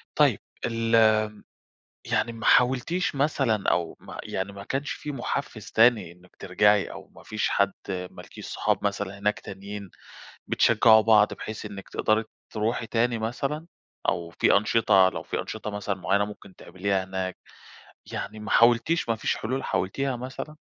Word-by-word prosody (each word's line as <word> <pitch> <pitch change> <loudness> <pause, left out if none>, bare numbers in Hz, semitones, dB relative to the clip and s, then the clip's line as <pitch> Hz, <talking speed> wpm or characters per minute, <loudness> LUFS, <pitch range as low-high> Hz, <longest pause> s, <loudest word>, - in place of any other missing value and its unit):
طيب - - +4 0.3
ال 115 -2 +4 0.9
يعني 120 - +1
ما 115 - -7
حاولتيش 135 +8 +3
مثلًا، 135 -7 +1
أو 85 -2 -1
ما - - -10
يعني 95 +1 -3
ما 100 0 -9
كانش 135 +6 -3
فيه 150 - -5
محفّز 135 - -4
تاني 110 -7 +4
إنِّك 90 +1 -20
ترجعي، 105 +2 +2
أو - - -10
ما - - -14
فيش 110 0 -1
حد 100 -1 +2 0.2
مالكيش 90 -1 -7
صحاب - - -1
مثلًا 100 -1 -2
هناك 105 +1 0
تانيين 100 0 -8 0.6
بتشجعوا 110 -1 +5
بعض، 105 -1 +4
بحيث 110 0 -7
إنِّك 100 -2 -9
تقدري 110 +1 +1 0.3
تروحي 110 +1 -1
تاني 115 0 +1
مثلًا، 135 +8 -3 0.4
أو 85 -1 0
في - - +5
أنشطة 100 -3 +4
لو - - -5
في - - -3
أنشطة 110 -1 -6
مثلًا 105 -1 -3
معيّنة، 100 +3 +1
ممكن 100 -2 -11
تعمليها 95 +1 -2
هناك، 95 -1 -4 0.8
يعني 110 - -5
ما 105 - -7
حاولتيش 120 +7 +4
ما 115 - +2
فيش - - -1
حلول 130 +4 -3
حاولتيها 130 +8 -1
مثلًا؟ 130 +5 -7
110 Hz, 150 wpm, -26 LUFS, 100-120 Hz, 0.9 s, بتشجعوا